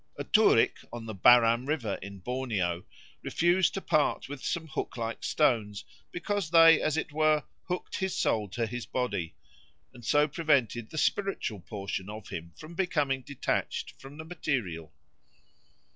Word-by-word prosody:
A - - -3
Turik - - +4
on 120 -1 -7
the 110 - -5
Baram 120 +4 +5
River, 135 -10 -1
in 100 0 -9
Borneo, 100 -8 -2 0.4
refused 175 +2 +2
to 195 - -3
part 155 -4 +1
with 140 -1 -8
some 165 -1 -2
hook 140 -4 -5
like 115 -1 -4
stones, 110 -9 +1 0.3
because 195 -1 -2
they, 165 -1 +7
as 155 0 0
it 160 - -2
were, 155 0 +2 0.2
hooked 180 0 -3
his 190 -1 -2
soul 105 -3 +1
to 115 +5 -2
his 120 +1 -6
body, 125 -10 -2 0.6
and 120 -1 -14
so 145 +5 +3
prevented 135 -7 +1
the 155 - -8
spiritual 190 - 0
portion 100 0 -5
of 105 -1 -8
him 85 +1 -6
from 155 +2 -10
becoming 150 -7 0
detached 140 +1 -3
from 135 +2 -11
the 160 - -7
material. 110 - -3
130 Hz, 155 wpm, -29 LUFS, 110-155 Hz, 0.6 s, they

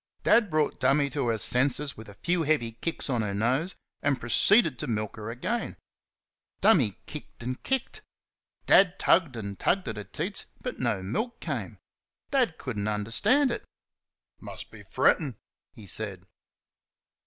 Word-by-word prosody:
Dad 225 -4 +4
brought 155 -2 0
"Dummy" 140 0 +3
to 140 -4 -1
her 115 -1 +1
senses 135 +5 +1
with 110 -1 -11
a 100 - -12
few 175 0 +2
heavy 150 -7 +1
kicks 125 +9 -3
on 125 -5 0
her 100 -2 -2
nose, 130 - 0 0.3
and 140 -2 +1
proceeded 155 - +4
to 150 - -2
milk 110 -3 -2
her 110 0 -6
again. 175 - -3 0.8
"Dummy" 135 - +4
kicked 150 -5 -9
and 130 +1 -4
kicked. 265 -2 -2 0.6
Dad 190 -1 +5
tugged 165 -7 +3
and 100 -3 -6
tugged 190 +1 +1
at 110 - -4
her 105 - -4
teats, - - -4 0.2
but - - -4
no 95 - 0
milk 220 - -3
came. - - -4 0.5
Dad 250 - +2
could 125 -6 -5
n't 100 - -2
understand 115 - +2
it. - - -4 0.8
"Must - - -9
be - - -12
frettin'," 145 -9 +2 0.4
he 105 - -12
said. 95 -1 -5
130 Hz, 155 wpm, -28 LUFS, 110-165 Hz, 0.8 s, Dad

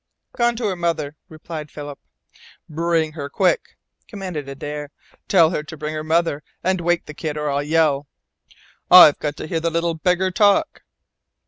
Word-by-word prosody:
"Gone 240 -1 +2
to 230 0 -3
her 195 -3 0
mother," 165 -4 -2
replied 155 -1 -8
Philip. 145 -1 -8 0.7
"Bring 165 0 0
her 145 -2 -6
quick!" 475 - 0 0.3
commanded 180 - -6
Adare. 145 +1 -6 0.4
"Tell 170 -4 +5
her 160 - -2
to 155 +1 -10
bring 150 +2 -4
her 155 0 -4
mother 160 -2 +1 0.2
and 185 0 0
wake 175 0 0
the 150 - -9
kid 150 0 -4
or 150 -1 -1
I'll 140 0 0
yell. 150 -2 +1 0.8
I've 175 -5 +9
got 150 -1 -3
to - - -6
hear 165 +1 -2
the 165 +1 0
little 170 +1 0
beggar 180 +3 0
talk." 200 +2 +2
160 Hz, 165 wpm, -21 LUFS, 150-175 Hz, 0.8 s, I've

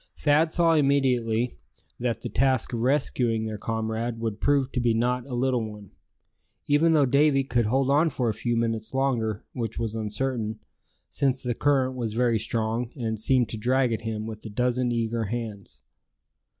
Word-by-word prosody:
Thad 155 +2 +3
saw 165 -1 +3
immediately 125 -5 +1 0.4
that 120 -1 -2
the - - -2
task 130 -2 +1
of 115 - -1
rescuing 120 -3 +1
their 110 -1 -5
comrade 110 +1 -3
would 110 -2 -3
prove 140 -2 +2
to 125 - -1
be 120 -2 +2
not 125 +2 0
a 125 - -4
little 125 -1 +1
one, 105 -3 -9 0.7
even 155 +3 +3
though 150 -3 +5
Davy 140 +1 +3
could 120 -4 0
hold 135 +3 +2
on 155 +4 +4
for 125 -4 -2
a 110 - +1
few 120 +2 -1
minutes 115 0 -2
longer, 115 -6 0
which 115 -3 -4
was 115 -2 -2
uncertain, 110 +1 -2 0.5
since 135 -2 0
the 125 -1 -1
current 130 0 +1
was 115 -4 -3
very 120 -1 +2
strong, 115 +2 -1
and 110 -5 -3
seemed 125 +2 +2
to 110 - -3
drag 125 +2 +1
at 110 - -3
him 110 -1 -4
with 110 -1 -7
a 110 - -7
dozen 125 +3 0
eager 115 -1 -1
hands. 110 -2 -6
120 Hz, 175 wpm, -26 LUFS, 110-135 Hz, 0.7 s, though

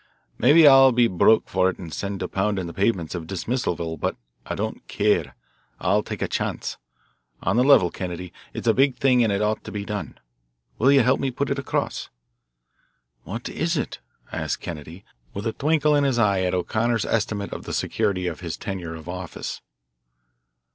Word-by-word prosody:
Maybe 150 +5 +7
I'll 135 -1 +8
be 120 -1 +4
'broke' 110 +3 +4
for 95 0 +2
it 95 - -5
and 85 -4 -8
sent 100 +3 -4
to - - -1
pounding 95 -1 -1
the 85 - -7
pavements 95 -5 0
of 85 -3 -5
Dismissalville, 90 -4 -2
but - - -1 0.3
I - - -3
don't - - -4
care, 85 -11 +1 0.4
I'll - - +2
take - - -5
a - - 0
chance. - - -3 0.7
On - - +1
the 125 - +4
level, 130 -11 +5
Kennedy, 90 -1 -6 0.2
it's - - -6
a 115 - +5
big 135 +1 +3
thing, 125 -3 +4
and 110 - +2
it 100 +1 0
ought 105 +1 0
to - - -8
be 100 -1 -4
done. 105 -1 -5 0.6
Will 130 +5 +5
you 140 -1 +6
help 130 +2 +3
me 135 - 0
put 140 +3 -2
it 140 - 0
across?" 140 - -2 1.2
"What 115 +6 -5
is 165 0 -1
it?" - - -3 0.3
asked - - -2
Kennedy 85 +4 -8 0.3
with 100 - -4
a 115 - -1
twinkle 150 0 +2
in 145 - +3
his 135 -3 +1
eye 100 -4 +3
at 90 0 0
O'Connor's 110 +3 0
estimate 105 -1 -1
of - - -7
the - - -5
security 90 -2 0
of 85 -4 -3
his 85 -3 -5
tenure 90 -4 -5
of 80 0 -11
office. 90 -1 -6
105 Hz, 190 wpm, -24 LUFS, 90-125 Hz, 1.2 s, I'll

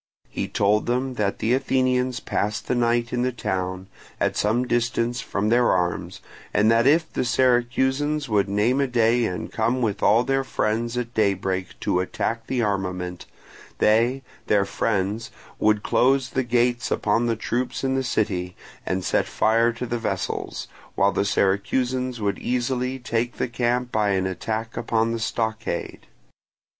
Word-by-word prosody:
He - - -3
told 105 +2 +1
them 125 +2 0
that 105 -4 -1
the 115 - +1
Athenians 130 -2 +1
passed 105 0 -2
the - - +1
night 120 0 +1
in 120 - 0
the 130 +1 +1
town, 95 -5 -3 0.3
at - - +1
some 115 +4 +1
distance 120 0 0
from 105 +2 -1
their 120 +1 +4
arms, 90 -1 -1 0.3
and 105 +1 +4
that 115 +2 +4
if 160 +2 +3
the - - 0
Syracusans 130 +4 +1
would 105 -3 +1
name 110 +7 +2
a 140 - +1
day 120 -1 +2
and 90 -4 -4
come 115 +3 0
with 110 -5 -1
all 115 +3 +4
their 135 +1 +1
people 130 - -2 0.3
at 120 -1 -5
daybreak 95 -3 -1
to 90 - +1
attack 115 +5 -2
the 125 -2 0
armament, 90 -3 -3 0.5
they, 120 +5 +3 0.2
their 100 -2 +3
friends, 105 +2 -1 0.3
would 105 -1 +2
close 135 0 +2
the 130 - +1
gates 120 0 +1
upon 115 +3 +1
the 115 - +1
troops 120 +4 -2
in 130 0 +1
the 135 - +1
city, 95 -7 -1 0.3
and 95 0 -2
set - - +1
fire 115 +2 +2
to 120 +2 -5
the 120 0 -2
vessels, 115 - -3 0.3
while 100 +1 +3
the 100 - 0
Syracusans 125 +6 0
would 100 -2 -1
easily 125 +1 -1
take 120 -1 -2
the - - 0
camp 120 +1 -1
by 105 -2 +1
an 95 -1 0
attack 110 +5 -3
upon 115 0 0
the 115 - -2
stockade. 110 -5 -3
115 Hz, 160 wpm, -24 LUFS, 105-125 Hz, 0.5 s, their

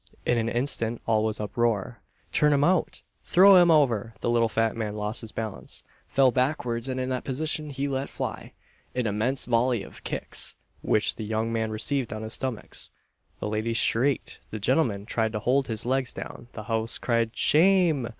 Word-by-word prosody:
In 120 - +2
an 115 0 -1
instant 120 -2 -1
all 110 -1 +2
was 110 -1 -1
uproar: 115 +1 -1 0.3
"Turn 150 0 +3
him 140 0 +3
out!" 180 +1 +1 0.2
"Throw 195 +2 +7
him 175 - +5
over!" 120 -9 +3
The 120 - 0
little 115 -1 +3
fat 115 0 0
man 110 -2 -3
lost 105 +1 -3
his 110 -2 -8
balance, 110 -2 -6 0.2
fell 135 -2 +4
backwards, 125 -2 -1
and 130 0 -2
in 130 0 -2
that 130 -1 -2
position 150 +2 -2
he 140 0 -2
let 135 0 -2
fly - - -5 0.4
"an 125 -1 0
immense 110 +6 0
volley 120 -2 +1
of - - -13
kicks," - - -2 0.3
which 110 - +1
the 110 - -4
young 110 +1 -1
man 110 -1 -1
received 120 +3 -1
on 110 +1 -5
his 110 - -4
stomach. 130 -5 -3 0.6
The - - -3
ladies 110 +2 -1
shrieked, 130 +5 +1
the 110 - -5
gentlemen 110 -3 +1
tried 110 -1 -1
to 105 - -1
hold 130 +5 +1
his 110 -1 -3
legs 130 0 +1
down, 120 - -8
the 110 - -7
house 115 0 -1
cried 115 -2 0
"Shame!" 165 -6 +3
120 Hz, 185 wpm, -26 LUFS, 110-135 Hz, 0.6 s, Throw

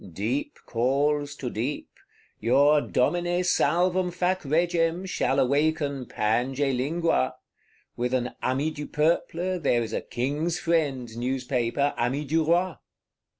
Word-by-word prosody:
Deep 115 - -2
calls 145 +4 0
to 135 - -6
deep: 130 +7 -3 0.5
your 140 +6 +4
Domine 175 +8 0
Salvum 180 +2 +2
Fac 180 +1 0
Regem 165 +3 +1
shall 140 -6 0
awaken 140 -1 +1
Pange 125 +5 0
Lingua; 140 - 0 0.6
with 125 +1 -1
an 125 -1 -1
Ami 140 +5 0
du 150 -1 -6
Peuple 170 +3 0
there 120 -7 +2
is 110 -1 -6
a - - -1
King's 150 +7 -2
Friend 140 -9 -1
Newspaper, 125 +2 -1
Ami 130 +5 -1
du 160 +3 +1
Roi. 170 -1 +1
145 Hz, 120 wpm, -26 LUFS, 125-165 Hz, 0.6 s, your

